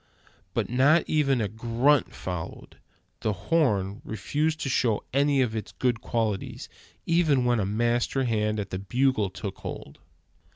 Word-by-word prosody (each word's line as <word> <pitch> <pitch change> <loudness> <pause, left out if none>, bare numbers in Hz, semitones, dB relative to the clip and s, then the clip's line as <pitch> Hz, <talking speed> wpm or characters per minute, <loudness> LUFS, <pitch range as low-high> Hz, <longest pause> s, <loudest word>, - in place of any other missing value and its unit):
But - - 0
not 140 +7 +4
even 140 -5 +2
a 105 - 0
grunt 120 +6 +2
followed. 90 -3 -7 0.4
The 110 - 0
horn 100 - 0
refused 155 +8 -1
to - - -2
show 115 -4 +1
any 140 0 +3
of 115 -3 -2
it's 110 - -5
good 120 -3 0
qualities, 110 -4 -2 0.4
even 160 -7 +3
when 120 -1 +2
a 95 - 0
master 120 +5 +1
hand 110 -3 0
at 100 -2 -5
the 95 - -3
bugle 120 0 +1
took 95 +1 -7
hold. - - -8
120 Hz, 150 wpm, -27 LUFS, 105-135 Hz, 0.4 s, not